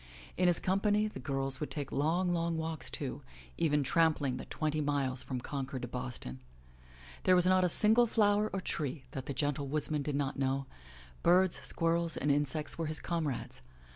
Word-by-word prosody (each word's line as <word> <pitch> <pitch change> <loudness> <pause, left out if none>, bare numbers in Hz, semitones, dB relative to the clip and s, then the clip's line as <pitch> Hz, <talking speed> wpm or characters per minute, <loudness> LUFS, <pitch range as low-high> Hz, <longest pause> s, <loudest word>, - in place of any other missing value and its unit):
In 180 - +2
his 175 - +4
company 205 +3 +2
the 215 - -8
girls 135 -2 -1
would 150 - -3
take 145 -2 -4
long, 175 +5 +1
long 170 -1 0
walks, 160 -1 -3
too, - - -4 0.4
even 150 -2 +2
tramping 145 -3 +2
the - - -7
twenty 155 -1 -1
miles 140 -3 0
from 130 -2 -4
Concord 135 0 -5
to - - -2
Boston. 120 - -5 0.8
There 185 - +5
was 180 -1 +3
not 185 0 +4
a 180 - +3
single 220 +6 +5
flower 210 -1 +3
or 195 - -2
tree 145 -5 -3
that 135 -1 -6
the 140 - -2
gentle 145 +1 -1
woodsman 150 +1 0
did 145 0 -2
not 140 -1 -1
know; 135 0 0 0.6
birds, 185 +1 +4
squirrels 165 0 0
and 145 - +1
insects 145 +2 -1
were 165 - -1
his 155 0 -3
comrades. 155 - -3
155 Hz, 180 wpm, -32 LUFS, 140-175 Hz, 0.8 s, There